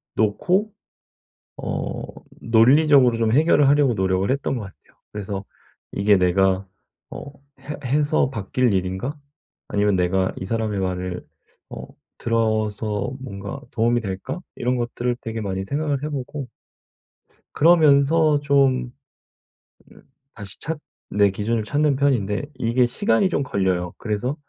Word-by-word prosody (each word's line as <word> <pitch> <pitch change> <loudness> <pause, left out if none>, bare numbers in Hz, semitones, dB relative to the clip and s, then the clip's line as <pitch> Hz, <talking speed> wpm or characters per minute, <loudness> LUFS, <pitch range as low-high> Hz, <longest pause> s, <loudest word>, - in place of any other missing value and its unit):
놓고 180 - +1 0.9
어 - - -4 0.4
논리적으로 125 +2 +5
좀 115 -1 +1
해결을 145 +2 +4
하려고 145 -3 +4
노력을 95 -1 0
했던 135 0 -1
것 120 - -4
같아요. 95 -1 -15
그래서 100 -1 -5 0.5
'이게 100 0 +3
내가 95 +1 +2 0.4
어 140 - -8 0.3
해 150 +2 -6
해서 145 +2 +1
바뀔 120 0 0
일인가?' 95 +10 -2 0.5
아니면 105 -1 +1
'내가 95 +1 +1
이 - - -5
사람의 110 -1 -2
말을 90 -1 -3 0.4
어 - - -8 0.3
들어서 110 -2 -1
뭔가 100 +1 -7
도움이 120 +1 +1
될까?' 95 - -5 0.2
이런 125 +1 -1
것들을 120 0 -2
되게 115 0 -5
많이 95 -2 -3
생각을 145 +3 -2
해 150 - -2
보고. 140 -1 -5 1.0
그러면서 155 -1 +4
좀 135 -3 +2 1.0
으 - - -17 0.3
다시 100 -3 -9
찾 160 +1 -4 0.3
내 105 0 +3
기준을 110 +3 -1
찾는 145 +5 +1
편인데 120 -8 +1
이게 120 0 +1
시간이 205 - +1
좀 145 - 0
걸려요. 95 -6 -1
그래서 115 +5 -2
115 Hz, 260 characters per minute, -22 LUFS, 100-140 Hz, 1.0 s, 논리적으로